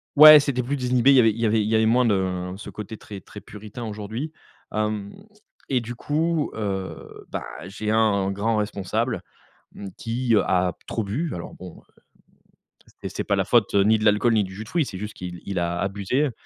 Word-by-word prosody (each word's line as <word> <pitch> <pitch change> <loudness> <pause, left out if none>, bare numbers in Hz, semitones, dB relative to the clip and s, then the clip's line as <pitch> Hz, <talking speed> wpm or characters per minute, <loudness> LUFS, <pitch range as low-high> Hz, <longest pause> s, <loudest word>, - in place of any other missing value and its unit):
Ouais, 155 +1 +11
c'était 140 -3 -1
plus 140 +4 -2
désinhibé, 125 +1 +3
il - - +6
y - - +8
avait 115 -2 +6
il - - -10
y - - +2
avait 110 0 +3
il 105 - -1
y 110 - +1
avait 110 0 +4
moins 120 +3 +4
de, 110 - +3
heu, 90 -1 -2
ce 105 - -9
côté, 105 +1 -7
très, 105 -2 -9
très 105 - -12
puritain 105 +3 -9
aujourd'hui, 110 +7 -5 0.4
hem 105 -1 -2 0.5
et 130 -2 +1
du 120 +1 -6
coup, 155 +4 -1
heu, 95 -3 -5
bah, - - -4 0.2
j'ai 105 +3 -4
un 105 -3 +2
grand 105 +3 0
responsable, 105 -3 -2 0.5
mmh, 100 - -8
qui, 120 +1 -1
heu, 105 - +5
a 90 -1 +1
trop 110 - -2
bu, 140 +12 -2
alors 85 - -7
bon, 90 -2 -11
heu, - - -28 1.2
et - - -1
c'est - - -4
pas 100 - +1
la 95 - +1
faute 105 +1 +2
ni 105 +3 +4
de - - -2
l'alcool 105 +3 +4
ni 110 - +3
du 95 -1 -6
jus 105 +3 -7
de - - -15
fruits, 165 +2 +1
c'est 95 - -7
juste 105 +2 -6
qu'il 90 -1 -7
il 95 -2 -2
a 85 0 -1
abusé, 100 +9 0
105 Hz, 220 wpm, -24 LUFS, 100-120 Hz, 1.2 s, Ouais